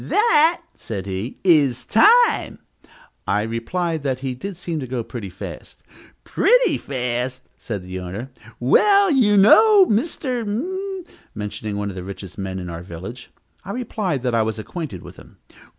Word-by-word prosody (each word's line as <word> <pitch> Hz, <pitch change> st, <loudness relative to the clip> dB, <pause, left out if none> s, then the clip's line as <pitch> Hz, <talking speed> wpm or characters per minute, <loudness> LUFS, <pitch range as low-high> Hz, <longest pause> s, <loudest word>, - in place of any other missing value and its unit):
"That," 345 Hz, -6 st, +3 dB
said 100 Hz, -4 st, -6 dB
he, 100 Hz, +5 st, -5 dB
"is 145 Hz, -9 st, +3 dB
time." 465 Hz, -, +4 dB, 0.7 s
I 105 Hz, +1 st, +1 dB
replied 155 Hz, +9 st, -2 dB
that 130 Hz, -2 st, -2 dB
he 135 Hz, -2 st, -3 dB
did 185 Hz, +9 st, -7 dB
seem 170 Hz, -3 st, -4 dB
to 130 Hz, -, -5 dB
go 120 Hz, -1 st, -3 dB
pretty 110 Hz, -4 st, -7 dB
fast. -, -, -10 dB, 0.4 s
"Pretty 485 Hz, -9 st, +3 dB
fast!" 125 Hz, -1 st, -3 dB
said 105 Hz, -5 st, -6 dB
his 90 Hz, 0 st, -6 dB
owner. 100 Hz, +9 st, -7 dB, 0.3 s
"Well, 395 Hz, -, +4 dB
do 280 Hz, -, +2 dB
you 210 Hz, -5 st, +4 dB
know 400 Hz, -, +7 dB
Mr. 250 Hz, -, -1 dB, 0.7 s
?" -, -, -28 dB
mentioning 105 Hz, 0 st, -5 dB
one 100 Hz, 0 st, -3 dB
of -, -, -11 dB
the 90 Hz, -, -6 dB
richest 95 Hz, -1 st, -9 dB
men 95 Hz, -1 st, -4 dB
in 90 Hz, -1 st, -6 dB
our 85 Hz, -1 st, -6 dB
village. 95 Hz, +8 st, -9 dB, 0.3 s
I 200 Hz, +2 st, -6 dB
replied 210 Hz, -, -3 dB
that 125 Hz, -2 st, 0 dB
I 115 Hz, -, +3 dB
was 110 Hz, 0 st, -2 dB
acquainted 110 Hz, -, -6 dB
with -, -, -12 dB
him. -, -, -16 dB
130 Hz, 165 wpm, -21 LUFS, -, 0.7 s, know